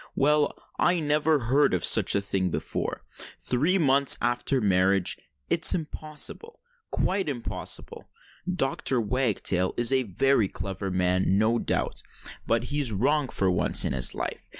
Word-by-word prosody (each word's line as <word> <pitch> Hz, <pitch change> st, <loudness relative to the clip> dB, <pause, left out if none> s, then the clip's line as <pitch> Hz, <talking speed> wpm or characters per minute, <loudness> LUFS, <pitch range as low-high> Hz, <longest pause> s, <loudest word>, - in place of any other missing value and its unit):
Well—I 150 Hz, +4 st, +1 dB
never 150 Hz, 0 st, +2 dB
heard 130 Hz, -1 st, +2 dB
of 90 Hz, -, -1 dB
such -, -, +4 dB
a 100 Hz, -, +1 dB
thing 95 Hz, -2 st, -1 dB
before—three 150 Hz, -, -2 dB
months 140 Hz, -4 st, +3 dB
after 120 Hz, +3 st, 0 dB
marriage—it's 95 Hz, -, +1 dB
impossible—quite 195 Hz, -, -5 dB
impossible! 120 Hz, -5 st, -6 dB, 0.4 s
Dr. 135 Hz, -6 st, 0 dB
Wagtail 105 Hz, -5 st, 0 dB
is 120 Hz, +1 st, +3 dB
a 135 Hz, -1 st, +3 dB
very 120 Hz, +1 st, +1 dB
clever 95 Hz, +1 st, -5 dB
man, 90 Hz, +1 st, +1 dB
no 110 Hz, +3 st, +2 dB
doubt—but -, -, -3 dB
he's 145 Hz, -4 st, -1 dB
wrong 135 Hz, +7 st, 0 dB
for 95 Hz, -2 st, 0 dB
once 90 Hz, -, +2 dB
in -, -, -1 dB
his 60 Hz, -2 st, +2 dB
life. -, -, -4 dB
125 Hz, 120 wpm, -26 LUFS, 95-150 Hz, 0.4 s, such